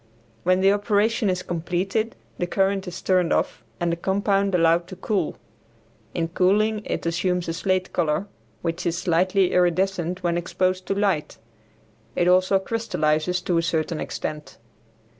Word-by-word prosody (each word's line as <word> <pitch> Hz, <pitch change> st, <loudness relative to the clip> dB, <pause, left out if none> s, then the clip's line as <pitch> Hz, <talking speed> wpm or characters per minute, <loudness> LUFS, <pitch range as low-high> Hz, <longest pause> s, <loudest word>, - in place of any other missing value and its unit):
When 185 Hz, +1 st, +2 dB
the 195 Hz, +1 st, +5 dB
operation 210 Hz, +2 st, +1 dB
is 185 Hz, 0 st, -1 dB
completed 180 Hz, +6 st, -2 dB, 0.2 s
the 175 Hz, -, 0 dB
current 195 Hz, +1 st, 0 dB
is 180 Hz, 0 st, -7 dB
turned 185 Hz, -3 st, +2 dB
off -, -, 0 dB, 0.2 s
and 175 Hz, -1 st, 0 dB
the -, -, 0 dB
compound 195 Hz, +2 st, +1 dB
allowed 170 Hz, 0 st, +3 dB
to 185 Hz, -, -8 dB
cool. 190 Hz, -2 st, -1 dB, 0.8 s
In 165 Hz, -1 st, -1 dB
cooling 210 Hz, +5 st, +2 dB
it -, -, -3 dB
assumes 175 Hz, +1 st, 0 dB
a 165 Hz, -, -1 dB
slate 185 Hz, +2 st, -1 dB
color, 165 Hz, +2 st, 0 dB, 0.4 s
which 165 Hz, +1 st, -2 dB
is 170 Hz, 0 st, 0 dB
slightly 185 Hz, +2 st, +2 dB
iridescent 180 Hz, 0 st, +1 dB
when 170 Hz, 0 st, +1 dB
exposed 185 Hz, +1 st, -1 dB
to 195 Hz, -, 0 dB
light. 195 Hz, -7 st, 0 dB, 0.8 s
It 175 Hz, -, +2 dB
also 185 Hz, +2 st, +4 dB
crystallizes 180 Hz, -5 st, 0 dB
to 175 Hz, -2 st, +1 dB
a -, -, +2 dB
certain 165 Hz, -1 st, -1 dB
extent. 150 Hz, -1 st, -5 dB
185 Hz, 150 wpm, -24 LUFS, 170-195 Hz, 0.8 s, the